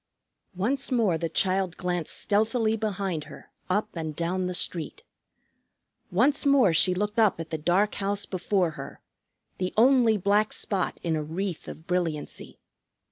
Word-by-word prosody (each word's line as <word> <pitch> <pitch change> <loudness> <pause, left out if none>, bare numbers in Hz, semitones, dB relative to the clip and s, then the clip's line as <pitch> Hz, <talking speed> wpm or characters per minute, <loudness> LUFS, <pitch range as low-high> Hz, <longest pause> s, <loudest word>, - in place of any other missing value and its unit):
Once 255 +10 -1
more 225 -8 +2
the 165 0 -2
child 185 +1 0
glanced 175 -3 -2
stealthily 220 +2 +1
behind 195 -7 -3
her, 145 -2 -13 0.2
up 205 +4 +1
and 160 -3 -5
down 180 +3 -1
the 180 - -3
street. 170 -2 -1 1.1
Once 255 +10 +2
more 275 - +4
she 180 +3 +4
looked 210 +3 -1
up 215 -6 +3
at 165 -1 -7
the 160 - -1
dark 185 +6 +2
house 200 0 -1
before 185 -1 0
her, 140 -3 -9 0.6
the 185 0 -1
only 240 -2 +5
black 205 +2 +2
spot 190 -4 -2
in 165 -2 0
a 155 - -1
wreath 170 +3 -4
of 160 - -9
brilliancy. 170 -4 -3
185 Hz, 150 wpm, -26 LUFS, 170-210 Hz, 1.1 s, only